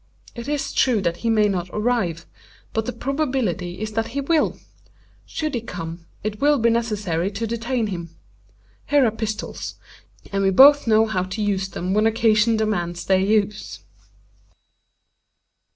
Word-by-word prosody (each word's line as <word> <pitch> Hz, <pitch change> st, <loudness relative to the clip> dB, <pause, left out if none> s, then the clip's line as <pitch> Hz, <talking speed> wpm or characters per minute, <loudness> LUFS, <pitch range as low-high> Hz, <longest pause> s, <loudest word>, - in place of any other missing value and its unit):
It 235 Hz, +1 st, -8 dB
is 290 Hz, -1 st, -2 dB
true 245 Hz, -5 st, +3 dB
that 170 Hz, -2 st, -1 dB
he 230 Hz, -, -2 dB
may 215 Hz, -2 st, +4 dB
not 185 Hz, -3 st, -2 dB
arrive; 210 Hz, -7 st, -1 dB, 0.5 s
but 220 Hz, 0 st, -1 dB
the -, -, -1 dB
probability 250 Hz, -, -2 dB
is 215 Hz, 0 st, -4 dB
that 225 Hz, +1 st, -1 dB
he 275 Hz, -, -4 dB
will. 310 Hz, +2 st, +1 dB, 0.7 s
Should 310 Hz, -2 st, -3 dB
he 240 Hz, -, -1 dB
come, 170 Hz, -5 st, -7 dB, 0.2 s
it 210 Hz, 0 st, -4 dB
will 290 Hz, +1 st, +4 dB
be 235 Hz, -1 st, +3 dB
necessary 205 Hz, -7 st, -1 dB
to 210 Hz, +3 st, -4 dB
detain 235 Hz, +1 st, -1 dB
him. 175 Hz, -5 st, -5 dB, 0.8 s
Here 285 Hz, -2 st, +4 dB
are 225 Hz, -, +2 dB
pistols; 220 Hz, -1 st, -5 dB, 0.6 s
and 195 Hz, 0 st, 0 dB
we 195 Hz, -, +4 dB
both 280 Hz, +7 st, +7 dB
know 220 Hz, 0 st, +5 dB
how 215 Hz, -4 st, -1 dB
to 190 Hz, +4 st, -5 dB
use 195 Hz, -2 st, 0 dB
them 185 Hz, 0 st, -3 dB
when 215 Hz, +2 st, +3 dB
occasion 225 Hz, 0 st, +3 dB
demands 175 Hz, -6 st, -2 dB
their 190 Hz, -1 st, +3 dB
use." 210 Hz, +1 st, 0 dB
215 Hz, 155 wpm, -22 LUFS, 190-235 Hz, 0.8 s, both